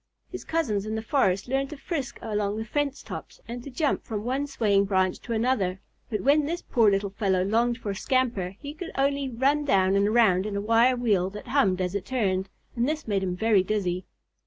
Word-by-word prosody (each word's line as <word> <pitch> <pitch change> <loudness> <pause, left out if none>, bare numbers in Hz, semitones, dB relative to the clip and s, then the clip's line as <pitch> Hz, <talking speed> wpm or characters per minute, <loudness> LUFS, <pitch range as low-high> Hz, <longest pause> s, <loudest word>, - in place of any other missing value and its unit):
His - - -6
cousins 220 -11 -1
in 215 - -2
the 220 - -3
forest 205 -6 +1
learned 270 +1 0
to 300 - -8
frisk 275 -4 -4
along 210 -1 -1
the 220 - -3
fence 285 +4 -2
tops - - -8
and 240 +1 -6
to 280 - -7
jump 285 +2 0
from 210 -2 -4
one 265 +4 -1
swaying 205 -7 +2
branch 190 -2 +1
to 240 - -9
another, 220 -5 0 0.3
but 215 -3 -2
when 290 +2 +3
this 340 +2 -3
poor 225 -3 +3
little 195 0 0
fellow 195 -3 +1
longed 235 +4 +1
for 215 -5 -4
a - - -4
scamper 230 -6 0
he 285 +5 -7
could 335 +2 -7
only 280 0 +1
run 280 +4 +1
around 190 0 +4
and 200 +1 +3
around 210 -4 +3
in 205 - -4
a - - 0
wire 230 +4 +4
wheel 205 -7 +1
that 210 +6 -9
hummed 200 -9 +2
as 180 0 -1
it 200 -2 -3
turned, 195 -7 0 0.3
and 240 +3 +1
this 305 -3 -3
made 200 -2 +1
him 180 -2 -2
very 215 0 +3
dizzy. 185 -2 -2
220 Hz, 220 wpm, -26 LUFS, 195-265 Hz, 0.3 s, around